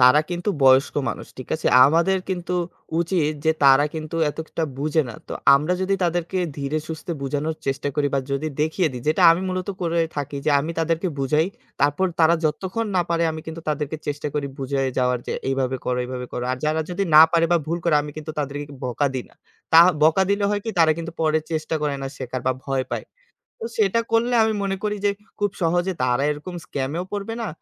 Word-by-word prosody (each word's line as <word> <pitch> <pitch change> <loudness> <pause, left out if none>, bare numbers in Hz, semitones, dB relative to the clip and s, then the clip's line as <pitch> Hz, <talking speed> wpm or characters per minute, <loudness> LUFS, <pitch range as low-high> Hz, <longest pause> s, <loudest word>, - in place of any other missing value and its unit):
তারা 125 +4 +7
কিন্তু 175 +4 -1
বয়স্ক 130 +1 +5
মানুষ, - - -5
ঠিক 130 - -8
আছে? 155 - -3 0.2
আমাদের 170 +6 +3
কিন্তু 180 -1 -2 0.5
উচিত 170 -3 +1
যে 160 - +4
তারা 135 +1 +7
কিন্তু 155 +1 -5
এতটা 160 +1 -4
বুঝে 155 +2 +1
না। 115 - -7
তো - - -5 0.2
আমরা 150 +6 +1
যদি 195 +1 +1
তাদেরকে 175 +2 -1 0.2
ধীরে 140 +2 -1
সুস্থে 160 +2 -5
বুঝানোর 150 +3 -2
চেষ্টা 135 +1 -1
করি 145 -1 +1
বা - - +2
যদি 145 +3 -1
দেখিয়ে 160 +3 +1
দিই, 125 -1 -7
যেটা 160 +4 +2
আমি 165 +2 +3
মূলত 185 0 -3
করে 170 0 0 0.2
থাকি 145 0 -3
যে - - +4
আমি 155 +4 -4
তাদেরকে 165 +3 0
বুঝাই 150 +4 +2 0.3
তারপর 145 +7 +2
তারা 160 +1 +6
যতক্ষণ 190 +8 -1
না 180 - +4
পারে 170 0 +1
আমি 160 - -6
কিন্তু 160 +1 -6
তাদেরকে 150 0 -2
চেষ্টা 145 0 -2
করি 145 -1 -1
বুঝায়ে 135 0 -1
যাওয়ার 125 -1 +2
যে - - -2 0.2
এইভাবে 135 -1 0
করো, 125 0 0
এইভাবে 125 0 -5
করো। 125 - -3
আর - - -2
যারা 155 +1 +1
যদি 195 +3 -1
না 155 - +12
পারে 165 -1 +4
বা - - +5
ভুল 170 +2 -1
করে 170 -3 +3
আমি 150 - -6
কিন্তু 155 0 -6
তাদেরকে 145 0 -3 0.2
বকা 125 +3 0
দিই 130 - -3
না। - - -24 0.4
তা 165 - +10 0.2
বকা 160 +5 +5
দিলে 200 0 +1
হয় 205 0 0
কি 225 - -2
তারা 160 -1 +6
কিন্তু 165 0 -5
পরে 155 -1 +3
চেষ্টা 155 0 -2
করে 145 -1 0
না - - -2
শেখার 130 -1 -4
বা 130 - +4
ভয় 135 -1 0
পায়। - - -3 0.5
তো 455 - -3
সেটা 400 - +2
করলে 235 +2 +2
আমি 220 - +1
মনে 195 -1 -1
করি 210 0 0
যে 205 - +4 0.3
খুব 205 -1 +1
সহজে 175 +3 +1
তারা 125 +1 +1
এরকম 150 +5 -5
স্ক্যামেও 145 +6 -3
পড়বে 205 +2 -3
না, 225 - -3
155 Hz, 210 wpm, -23 LUFS, 140-175 Hz, 0.5 s, না